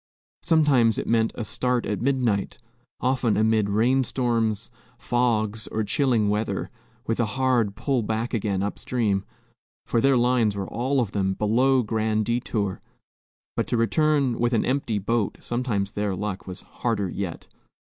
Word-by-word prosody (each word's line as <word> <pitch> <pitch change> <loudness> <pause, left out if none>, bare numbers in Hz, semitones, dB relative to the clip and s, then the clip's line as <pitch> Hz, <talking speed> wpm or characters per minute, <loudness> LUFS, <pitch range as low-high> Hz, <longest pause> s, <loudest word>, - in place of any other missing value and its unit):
Sometimes 140 -9 +3
it - - -2
meant 115 -1 +2
a 115 - -4
start 125 +2 0
at 105 - -2
midnight, 120 -6 0 0.4
often 130 -3 +1
amid 110 -1 +2
rainstorms, 115 -1 +1 0.3
fogs, 110 -3 0
or 110 - -2
chilling 115 -1 +2
weather, 105 +2 -1 0.3
with 115 - -1
a 120 - +2
hard 125 -6 +2
pull 125 +2 0
back 110 +2 -2
again 100 -4 0
up 100 - -3
stream, 105 -6 0 0.6
for 115 - +1
their 135 -1 +4
lines 120 -4 +2
were 100 -1 -3
all 130 +3 0
of 110 -5 -2
them 95 -1 0
below 125 +5 +3
Grand 110 0 0
Detour; 110 -4 -2 0.7
but - - -1
to 120 - 0
return 140 +1 +2
with 120 +1 +1
an 115 - +2
empty 130 -5 0
boat, 105 +1 -1
sometimes 115 -5 -2
their 105 -2 -2
luck, 100 0 -4
was 90 0 -7
harder 110 -5 -2
yet. 90 -1 -5
115 Hz, 150 wpm, -25 LUFS, 105-125 Hz, 0.7 s, their